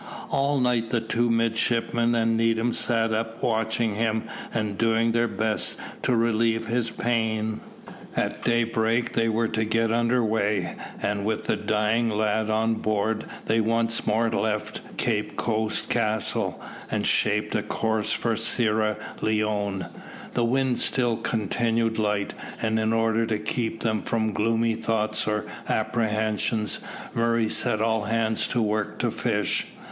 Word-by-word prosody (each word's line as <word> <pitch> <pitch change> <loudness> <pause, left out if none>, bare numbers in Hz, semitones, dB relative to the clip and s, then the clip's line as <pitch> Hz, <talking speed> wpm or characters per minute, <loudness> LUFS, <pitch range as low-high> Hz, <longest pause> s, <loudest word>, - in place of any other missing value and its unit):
All 140 +1 +2
night 120 -2 +1
the 120 - +1
two 120 +1 0
midshipmen 115 +1 +1
and 115 0 +2
Needham 115 +1 +2
sat 115 -2 +1
up 115 +1 -3
watching 110 -1 +1
him, 110 +1 0 0.3
and 105 -3 -1
doing 115 +2 +2
their 115 +1 +2
best 110 -1 -1 0.2
to 125 - +2
relieve 115 0 +2
his 115 0 0
pain. 110 -2 -1 0.6
At - - -1
daybreak 115 0 +1
they 115 0 +2
were 115 +1 +1
to 110 0 0
get 115 +1 +1
under 120 +1 +2
weigh, 105 -4 0 0.3
and 100 -1 0
with 110 +1 -1
the - - +1
dying 110 +2 +1
lad 110 0 0
on 110 +1 +2
board 110 +1 0 0.2
they 110 +1 +2
once 115 +1 0
more 115 +2 +2
left 105 +1 -1 0.2
Cape 105 -3 -1
Coast 110 -2 -1
Castle 110 -3 0 0.3
and - - -1
shaped 105 0 +2
a 105 - +1
course 110 0 -1
for 115 -1 0
Sierra 110 -1 +1 0.2
Leone. 105 -3 0 0.5
The 120 - +2
wind 130 +1 +1
still 120 -3 +1
continued 115 +1 0
light, 105 -1 0 0.3
and 110 -1 +1
in 110 0 +1
order 115 0 +2
to 110 -2 0
keep 110 +1 -2
them 110 -2 0
from 110 -2 -1
gloomy 115 +2 +1
thoughts 110 -1 -1
or 105 0 0 0.2
apprehensions, 110 -1 0 0.3
Murray 115 -1 +2
set 105 - 0
all 110 -2 +1
hands 110 0 +1
to 120 - 0
work 105 -1 -1
to - - 0
fish. - - 0
110 Hz, 145 wpm, -25 LUFS, 110-115 Hz, 0.6 s, All